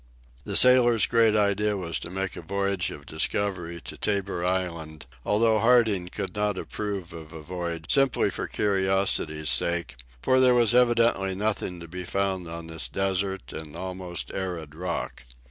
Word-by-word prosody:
The - - -3
sailor's 125 -3 +5
great 115 -2 +3
idea 105 0 +2
was 85 -3 -2
to - - -7
make 95 +1 -4
a - - -7
voyage 100 0 -1
of 70 - -10
discovery 85 +1 -2
to - - -9
Tabor 100 -4 -1
Island, 85 -4 -3 0.2
although 110 +1 +3
Harding 115 -6 +3
could 95 +1 -5
not 105 -1 0
approve 100 -4 -5
of 80 -2 -10
a 80 -1 -9
voyage 85 -1 -5
simply 135 -2 +3
for - - -4
curiosity's 95 -6 +1
sake, 85 -5 0 0.2
for 130 - +3
there 125 -1 +5
was 120 -1 +4
evidently 115 -6 +3
nothing 100 -3 -2
to 85 - -9
be 90 +2 -6
found 95 -1 -2
on 85 0 -7
this 80 -6 -1
desert 95 -4 -2
and 80 -1 -8
almost 90 0 -4
arid 85 -6 -4
rock. 85 -4 -4
95 Hz, 160 wpm, -26 LUFS, 85-105 Hz, 0.2 s, sailor's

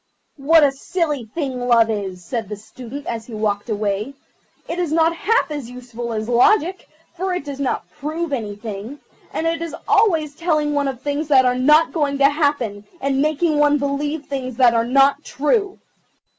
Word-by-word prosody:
"What 310 +3 +5
a 280 - +5
silly 295 -2 -2
thing 255 0 -4
Love 230 -2 +4
is," 190 -4 -5
said 225 +1 -4
the 210 - -4
Student 250 +6 -10
as 230 -1 -5
he 230 - -8
walked 210 0 -2
away. 210 +4 -2 0.5
"It 345 - -4
is 345 -4 -1
not 325 +1 +3
half 445 0 +1
as 285 -6 -5
useful 245 -1 -7
as 220 -1 -3
Logic, 360 - +3 0.3
for 365 +1 -2
it 330 - -4
does 280 -1 -6
not 275 -3 -2
prove 310 +2 -4
anything, 215 +1 -5 0.3
and 320 - -3
it 330 0 0
is 335 -1 -4
always 345 -9 +3
telling 305 -2 0
one 285 -1 +1
of 265 -2 -4
things 290 +1 -2
that 265 -3 +5
are 250 - +3
not 300 +6 +4
going 290 -4 0
to 275 0 +5
happen, 285 -9 -1 0.2
and 275 0 0
making 305 +1 +1
one 295 0 +4
believe 285 +2 -2
things 255 -3 -5
that 245 -2 +5
are 230 0 +1
not 275 +3 +3
true. 395 - 0
280 Hz, 185 wpm, -20 LUFS, 235-310 Hz, 0.5 s, What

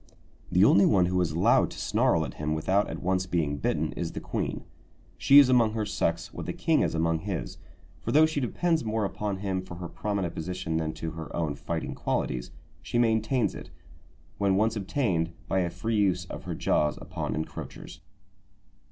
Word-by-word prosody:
The 90 +3 +5
only 100 -2 +6
one 95 -4 +4
who 90 0 +1
is 85 - +1
allowed 80 +3 +3
to - - -10
snarl 80 -1 +2
at 70 - -7
him 75 +1 -2
without 95 +6 +1
at - - -6
once 95 +1 0
being 80 -5 0
bitten 70 - -1
is - - -4
the - - -4
queen. - - -3 0.5
She 140 - +5
is 145 -2 +9
among 120 -4 +4
her 110 -1 -1
sex 85 -4 -1
what - - -6
the - - -2
king - - +2
is - - 0
among 80 0 +1
his; 95 0 -5 0.4
for - - -4
though 155 +2 +6
she 155 -2 -1
depends 160 +5 0
more 110 -1 -1
upon 100 0 -3
him 95 -2 -1
for 95 -2 -9
her 85 0 -6
prominent 100 -2 -3
position 80 0 -3
than 80 -1 -2
to 80 - -5
her 80 -1 -7
own 80 -4 -1
fighting - - -4
qualities, - - -2 0.3
she 70 - -3
maintains 115 +1 +2
it, - - -9 0.7
when 100 -2 +2
once 110 +3 +2
obtained, 95 -6 -1
by 95 - +1
a 90 -2 0
free 110 +6 -2
use 95 -4 +2
of - - -8
her - - -4
jaws 75 0 +1
upon 80 -4 -4
encroachers. 80 - -7
95 Hz, 195 wpm, -27 LUFS, 80-110 Hz, 0.7 s, is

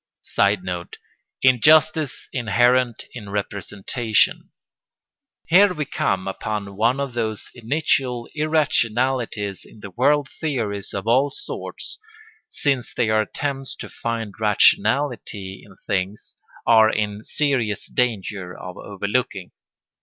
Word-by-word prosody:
[Sidenote: 90 -3 0 0.5
Injustice 155 +4 +4
inherent 120 +1 +2
in 105 -5 -8
representation] 105 +3 0 1.0
Here 185 +2 +6
we 150 -2 -2
come 95 -8 -1
upon 100 0 -4
one 115 +6 +2
of 140 -3 -3
those 110 -3 -3
initial 125 -1 0
irrationalities 130 - 0
in 110 - -16
the 100 - -8
world 145 +8 +2
theories 115 -9 -3
of 100 - -3
all 130 +5 +3
sorts, 410 - -6 0.5
since 135 -4 -1
they 110 - +1
are 110 0 +4
attempts 135 +5 -3
to - - -8
find 115 -3 -4
rationality 105 -2 +2
in 95 -2 -16
things, 100 +1 -3 0.3
are 110 -1 +6
in 105 -1 -2
serious 130 -9 0
danger 105 -6 -2
of 90 -1 -8
overlooking. 100 -1 -2
115 Hz, 110 wpm, -22 LUFS, 100-135 Hz, 1.0 s, Here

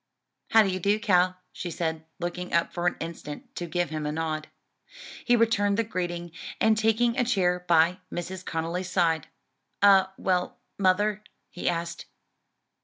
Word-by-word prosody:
"How 225 0 +7
d'ye 190 -2 -1
do, 200 +3 +2
Cal?" 185 -4 +3
she 175 - -5
said, 160 -1 -3 0.2
looking 175 +1 -4
up 170 0 +2
for 175 0 -1
an - - +1
instant 160 -3 -7
to 175 - -4
give 175 +1 -1
him 155 -1 -3
a - - -1
nod. 155 -1 -3 0.8
He 240 - +4
returned 210 -3 +2
the 230 - +2
greeting, 175 -4 -4 0.3
and 220 0 +4
taking 225 +2 +2
a - - +4
chair 180 -7 +1
by 170 +2 +4
Mrs. 185 +1 -5
Conly's 170 +3 -3
side, 165 -4 +1 0.6
"All 190 -1 +6
well, 180 -1 0 0.2
mother?" 205 +2 +2 0.3
he 180 - -1
asked. 170 0 -4
180 Hz, 155 wpm, -27 LUFS, 170-200 Hz, 0.8 s, How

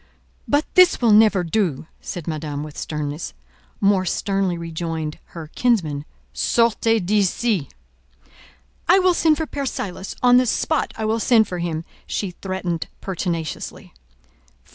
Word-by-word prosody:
"But 290 +2 +2
this 365 -1 +6
will 235 -3 +4
never 210 -3 +5
do," 170 -5 -1 0.2
said 175 -3 -6
Madame, 150 -2 -3
with 150 -1 -9
sternness. 150 +1 -4 0.4
More 195 -2 +3
sternly 190 0 0
rejoined 165 -2 -4
her 160 -2 -10
kinsman— 160 -13 +1 0.3
"Sortez 225 - +2
d'ici!" 200 - +1 1.2
"I 365 - +7
will 370 -1 +4
send 320 -3 +3
for 320 - -1
Père 280 -2 -4
Silas: 190 -4 -5
on 245 0 +7
the 255 0 +3
spot 315 +6 0
I 220 - -2
will 220 +1 +1
send 225 -2 +4
for 180 -2 -4
him," 165 -1 -3 0.2
she 195 -3 -2
threatened 180 -2 -4
pertinaciously. 170 - -4
190 Hz, 135 wpm, -22 LUFS, 165-225 Hz, 1.2 s, I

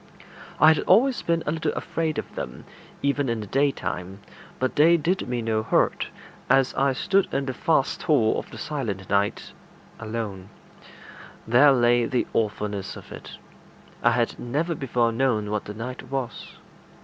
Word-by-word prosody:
I 155 - +8
had 155 - -2
always 245 +7 +4
been 170 -1 0
a - - 0
little 160 -1 -1
afraid 160 -2 -2
of - - -5
them, 60 - -7 0.4
even 140 -1 +1
in 115 -1 -1
the 105 - -5
daytime, 100 -7 -1 0.4
but 130 0 -1
they 165 +3 +6
did 175 +5 -1
me 120 -2 -2
no 110 -1 0
hurt, 110 - +1 0.4
and 135 0 +4
I 135 0 +2
stood 195 +8 +1
in 135 - -1
the 130 - -3
vast 145 +1 +1
hall 145 -10 +2
of - - -9
the - - -10
silent 105 -11 -4
night 100 0 0 0.5
alone: 110 -4 -5 1.0
there 130 +5 +6
lay 120 -2 +3
the 125 +1 0
awfulness 105 -2 -2
of - - -13
it. - - -10 0.6
I - - +5
had - - 0
never 150 +8 -1
before 125 -5 0
known 115 -4 0
what 105 -1 -2
the 105 - -6
night 125 +3 -7
was. 130 -3 -4
125 Hz, 160 wpm, -25 LUFS, 110-150 Hz, 1.0 s, I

